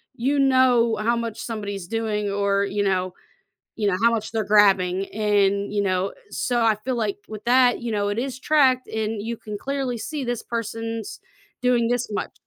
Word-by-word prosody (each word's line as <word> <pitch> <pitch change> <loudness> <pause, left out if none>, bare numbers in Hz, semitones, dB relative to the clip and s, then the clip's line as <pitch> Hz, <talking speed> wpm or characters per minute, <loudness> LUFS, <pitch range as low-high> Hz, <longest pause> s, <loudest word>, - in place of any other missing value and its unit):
you 275 +4 0
know 255 -4 +4
how 235 +2 +1
much 230 -1 -4
somebody's 205 -5 -5
doing, 215 -2 -2
or, 200 0 +1
you 205 +1 -2
know 185 -2 0 0.7
you 205 - +1
know, 200 - +2
how 235 - +6
much 220 -1 -2
they're 220 -1 0
grabbing, 195 -2 +3
and, 205 -1 +1
you 205 - +1
know, 190 0 0 0.2
so 240 +3 -1
I 225 -2 +4
feel 255 -2 -1
like 215 -3 -1
with 215 -1 -8
that, 250 +1 +4
you 235 -2 -3
know, 205 -1 0
it 205 +2 -2
is 255 0 -2
tracked, 265 -3 +2
and 220 -1 -3
you 230 +2 -4
can 210 -1 -7
clearly 270 0 -3
see 295 +2 -4
this 240 -1 -3
person's 225 -1 -5 0.4
doing 245 -2 +3
this 245 0 -1
much. 205 - -3
220 Hz, 190 wpm, -23 LUFS, 205-240 Hz, 0.7 s, how